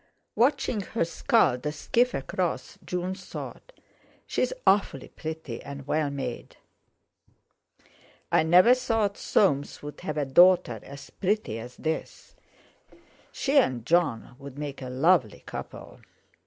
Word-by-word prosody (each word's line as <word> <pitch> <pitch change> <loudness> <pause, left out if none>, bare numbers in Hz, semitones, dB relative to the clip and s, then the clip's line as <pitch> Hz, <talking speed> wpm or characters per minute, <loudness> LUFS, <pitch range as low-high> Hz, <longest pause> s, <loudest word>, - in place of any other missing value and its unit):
Watching 255 -3 +1
her 200 -1 -1
scull 170 - +2
the 150 +3 -3
skiff 240 +10 +1
across, 175 +6 -3
June 180 +1 -3
thought: 190 - -9 0.5
'She's - - 0
awfully 195 -9 +2
pretty 155 -7 -6
and 140 -1 -8
well 150 +1 0
made. 135 -4 -6 1.7
I - - +5
never 180 +9 +6
thought 225 -5 0
Soames 145 -9 +1
would 150 0 -8
have 155 -1 -4
a 145 - 0
daughter 175 -4 +5
as 140 0 -11
pretty 195 - -1
as 120 +2 -9
this. 160 0 -4 1.0
She 280 0 +2
and 125 - 0
Jon 160 -9 +1
would 140 -1 -10
make 145 -2 -6
a 130 - -6
lovely 135 - +2
couple. - - -8
160 Hz, 125 wpm, -27 LUFS, 135-195 Hz, 1.7 s, never